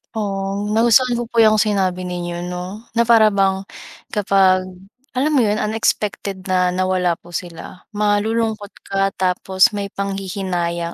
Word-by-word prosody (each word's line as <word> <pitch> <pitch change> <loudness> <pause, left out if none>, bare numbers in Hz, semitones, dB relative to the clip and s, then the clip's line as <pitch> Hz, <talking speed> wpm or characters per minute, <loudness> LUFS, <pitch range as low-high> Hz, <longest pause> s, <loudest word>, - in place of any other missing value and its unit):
Oh, 195 -2 -2 0.2
nagustuhan 235 +3 +3
ko 240 - -3
po 230 0 +1
'yong 215 -1 +5
sinabi 190 -4 0
ninyo, 175 -1 -4
'no, 180 +5 -6
na 235 - +2
para 225 -2 +5
bang 195 -1 +1 0.5
kapag 190 -2 +3 0.6
alam 295 +4 +1
mo 275 - +4
'yon 210 -2 +1
unexpected 210 -3 -2
na 185 -1 +2
nawala 180 -1 0
po 175 - -17
sila, 175 +1 -7 0.2
malulungkot 210 0 0 0.2
ka 195 0 0
tapos 190 +2 +2
may 200 -1 -3
panghihinayang. 185 -4 -3
195 Hz, 135 wpm, -19 LUFS, 185-215 Hz, 0.6 s, yong